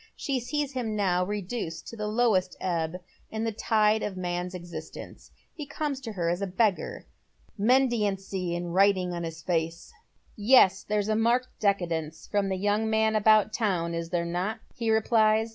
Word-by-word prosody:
She 275 Hz, -2 st, -2 dB
sees 280 Hz, +4 st, -2 dB
him 240 Hz, -5 st, -3 dB
now 185 Hz, -3 st, +1 dB
reduced 190 Hz, -4 st, -4 dB
to -, -, -9 dB
the 210 Hz, -1 st, -3 dB
lowest 210 Hz, -5 st, +1 dB
ebb 170 Hz, -1 st, -2 dB, 0.3 s
in 220 Hz, 0 st, -3 dB
the 225 Hz, -, 0 dB
tide 215 Hz, 0 st, +2 dB
of 190 Hz, -2 st, -4 dB
man's 180 Hz, 0 st, -3 dB
existence. 175 Hz, -1 st, -9 dB, 0.2 s
He 300 Hz, -3 st, -7 dB
comes 290 Hz, -3 st, -3 dB
to 230 Hz, -4 st, -6 dB
her 175 Hz, -4 st, -2 dB
as 175 Hz, +3 st, 0 dB
a 200 Hz, -, -1 dB
beggar. 195 Hz, +1 st, 0 dB, 0.5 s
Mendicancy 200 Hz, -7 st, +1 dB
is 175 Hz, -, -4 dB
written 185 Hz, +1 st, +2 dB
on 170 Hz, -, -4 dB
his 165 Hz, -1 st, -6 dB
face. 165 Hz, -1 st, -2 dB, 0.2 s
" -, -, -36 dB
Yes, 205 Hz, -3 st, +5 dB
there's 210 Hz, -1 st, -1 dB
a 215 Hz, -, +1 dB
marked 235 Hz, +3 st, +2 dB
decadence 165 Hz, -6 st, -1 dB
from 205 Hz, -1 st, 0 dB
the 190 Hz, -, -1 dB
young 205 Hz, +3 st, +1 dB
man 220 Hz, 0 st, +2 dB
about 215 Hz, 0 st, +4 dB
town, 180 Hz, -7 st, 0 dB
is 165 Hz, 0 st, -3 dB
there 170 Hz, -1 st, -1 dB
not?" 180 Hz, +5 st, -2 dB, 0.2 s
he 230 Hz, -1 st, -2 dB
replies. 220 Hz, 0 st, +3 dB
205 Hz, 175 wpm, -27 LUFS, 180-220 Hz, 0.5 s, Yes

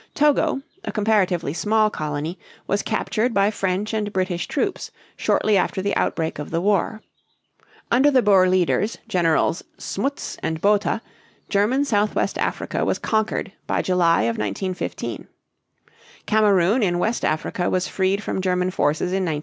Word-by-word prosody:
Togo, 290 Hz, -2 st, +2 dB, 0.2 s
a -, -, -4 dB
comparatively 195 Hz, -8 st, +1 dB
small 215 Hz, +5 st, +2 dB
colony, 155 Hz, +2 st, -4 dB, 0.3 s
was 200 Hz, +1 st, 0 dB
captured 225 Hz, +2 st, -1 dB
by 200 Hz, +1 st, +3 dB
French 195 Hz, +1 st, -2 dB
and 210 Hz, -1 st, -1 dB
British 185 Hz, -2 st, -1 dB
troops -, -, -2 dB, 0.3 s
shortly 215 Hz, -2 st, +2 dB
after 190 Hz, -, 0 dB
the 200 Hz, +2 st, -1 dB
outbreak 160 Hz, -2 st, -1 dB
of 150 Hz, -, -5 dB
the 165 Hz, -, -1 dB
war. 205 Hz, +3 st, 0 dB, 0.9 s
Under 265 Hz, +5 st, +5 dB
the 260 Hz, -4 st, +3 dB
Boer 190 Hz, -3 st, +5 dB
leaders, 185 Hz, +4 st, +1 dB
Generals 170 Hz, -4 st, +1 dB
Smuts 275 Hz, +8 st, -3 dB
and 160 Hz, 0 st, -2 dB
Botha, 205 Hz, +4 st, +1 dB, 0.5 s
German 225 Hz, +8 st, +2 dB
Southwest 210 Hz, -4 st, 0 dB
Africa -, -, -1 dB
was -, -, 0 dB
conquered 220 Hz, -3 st, -1 dB, 0.2 s
by -, -, 0 dB
July 175 Hz, -2 st, +3 dB
of 115 Hz, 0 st, -1 dB
1915. 175 Hz, -, -4 dB, 1.0 s
Kamerun 210 Hz, +1 st, +3 dB
in 175 Hz, -4 st, +1 dB
West 225 Hz, +6 st, -1 dB
Africa 155 Hz, +3 st, -1 dB
was 185 Hz, 0 st, 0 dB
freed 195 Hz, +2 st, 0 dB
from 190 Hz, -, -2 dB
German 180 Hz, 0 st, 0 dB
forces 160 Hz, +1 st, 0 dB
in 190 Hz, +1 st, 0 dB
1916. 155 Hz, -3 st, -1 dB
195 Hz, 145 wpm, -22 LUFS, 175-215 Hz, 1.0 s, Under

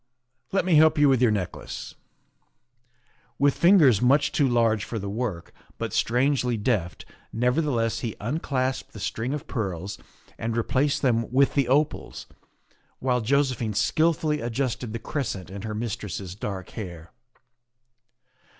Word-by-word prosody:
Let 195 Hz, -, +1 dB
me 175 Hz, -4 st, +4 dB
help 160 Hz, +1 st, +5 dB
you 145 Hz, 0 st, +5 dB
with 130 Hz, -3 st, +3 dB
your 125 Hz, -, +5 dB
necklace." 100 Hz, -5 st, -4 dB, 1.4 s
With 140 Hz, 0 st, +3 dB
fingers 160 Hz, -, +5 dB
much 140 Hz, +4 st, +3 dB
too 145 Hz, -, +2 dB
large 115 Hz, -4 st, +2 dB
for 115 Hz, -, -5 dB
the 100 Hz, -1 st, -4 dB
work, 105 Hz, -6 st, -4 dB, 0.2 s
but -, -, -4 dB
strangely 125 Hz, 0 st, +1 dB
deft, 100 Hz, -7 st, -1 dB, 0.3 s
nevertheless, 125 Hz, -1 st, 0 dB
he 115 Hz, -3 st, -4 dB
unclasped 130 Hz, +1 st, -2 dB
the 110 Hz, -, -9 dB
string 115 Hz, +5 st, -3 dB
of 150 Hz, -1 st, -4 dB
pearls 95 Hz, -5 st, -4 dB, 0.4 s
and 115 Hz, 0 st, -2 dB
replaced 135 Hz, +6 st, +1 dB
them 115 Hz, -3 st, +1 dB
with 135 Hz, +2 st, +3 dB
the 140 Hz, -3 st, +2 dB
opals, 145 Hz, +4 st, 0 dB, 0.7 s
while 125 Hz, -2 st, 0 dB
Jose 140 Hz, +3 st, +2 dB
phine 110 Hz, -3 st, -4 dB
skilfully 155 Hz, +5 st, +1 dB
adjusted 120 Hz, 0 st, -2 dB
the 115 Hz, -, -3 dB
crescent 110 Hz, -8 st, -4 dB
in 100 Hz, 0 st, -7 dB
her 110 Hz, 0 st, -4 dB
mistress's 105 Hz, -5 st, -4 dB
dark 95 Hz, -2 st, -6 dB
hair. 85 Hz, -6 st, -8 dB
120 Hz, 140 wpm, -25 LUFS, 110-140 Hz, 1.4 s, help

